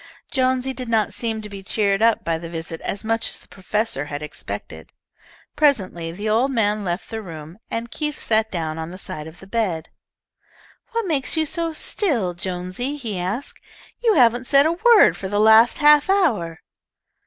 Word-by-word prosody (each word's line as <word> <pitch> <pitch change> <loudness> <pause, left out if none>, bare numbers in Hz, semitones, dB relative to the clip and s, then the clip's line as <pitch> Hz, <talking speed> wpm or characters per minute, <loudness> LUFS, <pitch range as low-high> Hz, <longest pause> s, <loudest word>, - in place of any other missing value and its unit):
Jonesy 260 0 +1
did 255 -2 -6
not 220 -2 +1
seem 225 -2 -3
to - - -6
be 200 -1 -9
cheered 200 +1 0
up 230 0 +3
by 165 -1 -1
the 165 0 -7
visit 165 0 -6
as 200 - -4
much 225 +1 0
as - - -1
the - - -16
professor 200 -5 -2
had 145 0 -6
expected. 150 - -7 0.6
Presently 195 - +1
the 205 +6 -5
old 230 +5 +2
man 210 -4 +1
left 175 0 -4
the 225 0 -4
room 165 -1 -10
and 230 +1 -4
Keith 300 -2 -3
sat 220 0 +1
down 160 -3 -3
on 160 0 -5
the 185 - -9
side 155 -4 -7
of 160 +2 -13
the - - -12
bed. 195 -6 -2 1.0
"What 460 -1 0
makes 300 -3 0
you 315 - +2
so 330 +2 -2
still, 275 - 0
Jonesy?" 185 +10 -4
he 220 -9 -4
asked. 200 +10 -4 0.4
"You 450 -3 +4
haven't 245 -1 +4
said 280 0 +5
a 320 - +3
word 415 - +5
for 190 - -5
the 205 +1 -1
last 220 +2 +6
half 295 +2 +5
hour." 225 - +1
220 Hz, 185 wpm, -22 LUFS, 180-265 Hz, 1.0 s, last